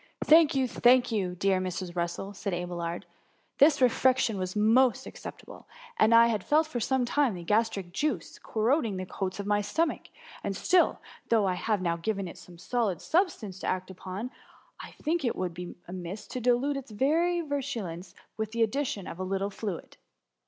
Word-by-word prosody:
^^ - - -20
Thank 315 -2 +7
you, 265 -1 +2
thank 245 0 +4
you! 190 -5 -1
dear 190 +1 +2
Mrs. 185 -1 -4
Russell,^ 175 +3 -3
said 195 -2 -3
Abelard; 175 -1 -4 0.5
^^ - - -53
this 295 +1 +6
refection 255 -3 +3
was 185 +1 -3
most 245 +4 +4
ac» - - -9
ceptable. - - -10 0.3
I 230 +1 +7
had 220 -5 0
felt 310 +2 +3
for 310 -6 -4
some 260 +2 +1
time 265 -3 +1
the 175 - -7
gastric 210 -2 0
juice 230 - -2
corroding 225 -1 0
the 185 - -4
coats 185 +1 -4
of 200 - -3
my 205 0 +2
stomach; 320 +10 -1 0.4
and 195 - -2
atill, 360 - +3 0.3
though 225 -3 +4
I 185 - +1
have 205 +1 -1
now 170 -1 0
given 195 +2 -2
it 170 - -10
some 175 -1 -14
solid 210 -3 -1
substance 250 - 0
to - - -4
act 185 0 -2
upon, 190 +6 -6 0.5
I - - -9
think 325 +1 -1
it 240 - 0
would 185 -1 -2
not - - -17
be 180 0 -7
amiss 185 +3 -6
to 255 - -4
dilute 250 +4 +2
its 275 -2 -7
virulence 275 - -1 0.2
by 220 - +1
the 230 0 +2
addition 225 -4 -1
of 170 - -8
a - - -2
little 195 +2 -2
fluid. 200 -4 -6
215 Hz, 190 wpm, -28 LUFS, 185-260 Hz, 0.5 s, Thank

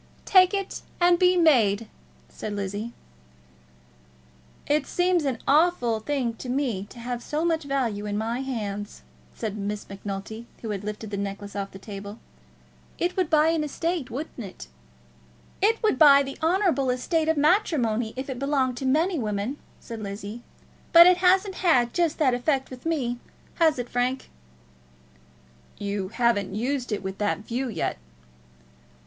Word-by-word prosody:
"Take 370 -2 +6
it 395 -1 -4 0.2
and 350 0 +4
be 360 0 +4
made," 230 - +4 0.4
said 215 - -6
Lizzie. 205 +3 -4 1.7
"It 295 -1 +1
seems 355 -3 +1
an 265 -4 0
awful 285 -7 +3
thing 250 -1 -1
to 250 - -7
me 245 -7 -1
to - - -14
have 240 0 -4
so 305 +6 -2
much 325 -3 0
value 235 -7 -1
in 205 0 -2
my 225 +3 -2
hands," 210 -6 -5 0.3
said 215 -3 -4
Miss 205 0 -4
Macnulty, 200 +3 -7 0.2
who 220 - -3
had 200 -1 -4
lifted 210 0 -6
the 200 - -3
necklace 200 0 -5
off 200 -1 -3
the 195 - -11
table. 200 +1 -8 0.8
"It 355 +1 -1
would 370 -4 0
buy 310 0 +4
an 325 -2 +1
estate; 325 0 -2
wouldn't 270 +4 -6
it?" 195 - -10 0.9
"It 440 +3 +4
would 425 -12 +2
buy 280 -2 +8
the 275 0 -7
honourable 330 -5 +2
estate 315 +6 0
of 320 - +2
matrimony 285 - +2
if 260 +1 -5
it 260 -3 -5
belonged 270 -3 0
to 265 - -2
many 320 +5 +2
women," 210 +4 -2 0.2
said 230 -2 -8
Lizzie, 205 +3 -6 0.5
"but 340 0 +11
it 360 0 +6
hasn't 380 +2 +3
had 255 -10 +3
just 340 -3 +1
that 270 -5 +3
effect 265 +2 0
with 255 +4 -7
me; 250 -7 -1 0.4
has 320 -3 +4
it, 245 -1 -3
Frank?" 250 +2 -2 1.5
"You 200 -1 -3
haven't 210 -3 0
used 250 +2 -2
it 205 - -2
with 190 0 -5
that 205 0 -1
view 250 +3 -2
yet." 165 - -2
250 Hz, 155 wpm, -25 LUFS, 210-315 Hz, 1.7 s, but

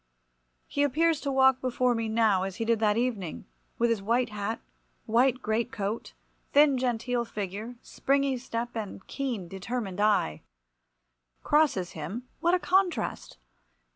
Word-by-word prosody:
He 285 - -2
appears 310 +3 +2
to 280 - -2
walk 265 -1 +4
before 250 -1 +1
me 225 -1 -2
now, 220 -4 +3
as 190 0 -3
he 225 - -3
did 230 -1 +2
that 215 -1 +2
evening, 210 - -2 0.3
with 235 0 +2
his 225 -3 0
white 235 +5 +1
hat, 210 +1 -3 0.5
white 250 +3 +2
great 225 +3 0
coat, 210 -2 -4 0.4
thin 285 -2 +5
genteel 245 -1 0
figure, 215 +1 -5
springy 275 -1 0
step, 240 -1 -4
and 205 -3 -6
keen 245 -10 -3
determined 195 +1 -4
eye. 200 - +2 1.0
Crosses 295 - +2
him, 190 +11 -6
what 345 +2 +3
a - - 0
contrast! 360 - 0
235 Hz, 140 wpm, -28 LUFS, 210-265 Hz, 1.0 s, thin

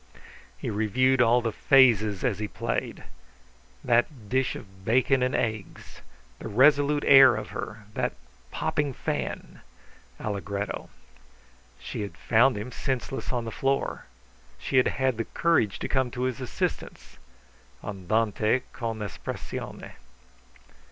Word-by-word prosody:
He - - -4
reviewed 130 +5 +2
all 120 +1 +4
the 115 - 0
phases 110 -7 +4
as 115 -7 0
he 105 - -2
played. - - -4 0.8
That 120 -2 +1
dish 130 +1 +1
of 95 -1 -12
bacon 130 +4 +2
and 125 +1 +1
eggs, 110 -3 -4 0.4
the - - -6
resolute 145 +6 +4
air 135 -3 +8
of 110 - -5
her, 110 0 -6
that - - -1 0.4
popping 145 - -1
fan! - - -4 0.6
[Allegretto.] 100 0 -4 0.9
She - - -6
had 100 - -6
found 120 +2 +3
him 110 +5 -6
senseless 130 0 -3
on 120 -2 -2
the 115 - -5
floor. 135 +3 -1 0.5
She 130 - -1
had 125 - +5
had 130 -3 0
the 115 - -2
courage 165 - +1
to - - -4
come 130 -2 +1
to 125 +1 -4
his 130 +1 -2
assistance. 125 - -4 0.6
[Andante 110 +4 0
con 115 -2 -4
espressione. 105 - -6
120 Hz, 125 wpm, -27 LUFS, 105-130 Hz, 0.9 s, air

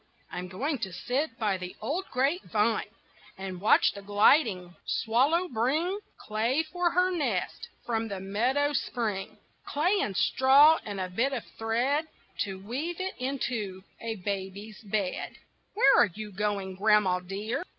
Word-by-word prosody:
I'm 180 0 -5
going 265 - -2
to 195 -4 -4
sit 250 - -2
by 205 -4 0
the 180 0 -7
old 310 - -2
grapevine, 250 - +1 0.5
And 190 -2 -6
watch 210 - +5
the 200 - -8
gliding 205 - +3
swallow 280 +11 +2
bring 310 - 0 0.2
Clay 230 +8 0
for 350 +2 0
her 365 +2 +2
nest 240 - -2 0.2
from 225 -1 -1
the 200 -3 -5
meadow 250 +10 +1
spring 220 -8 -2 0.3
Clay 355 +8 +1
and 195 - -2
straw 280 +4 +6
and 205 -2 -5
a 185 - -2
bit 235 +10 0
of 245 - -3 0.2
thread 245 +7 +1 0.4
To 195 -2 -6
weave 315 - -3
it 375 0 -2
into 235 -8 -3 0.2
a 230 -1 -4
baby's 200 +2 -5
bed. 200 -3 -2 0.4
Where 275 -10 +6
are - - +4
you 215 -1 -6
going, 200 -1 -2
grandma 205 -3 +3
dear? 205 - -4
225 Hz, 145 wpm, -28 LUFS, 195-280 Hz, 0.5 s, straw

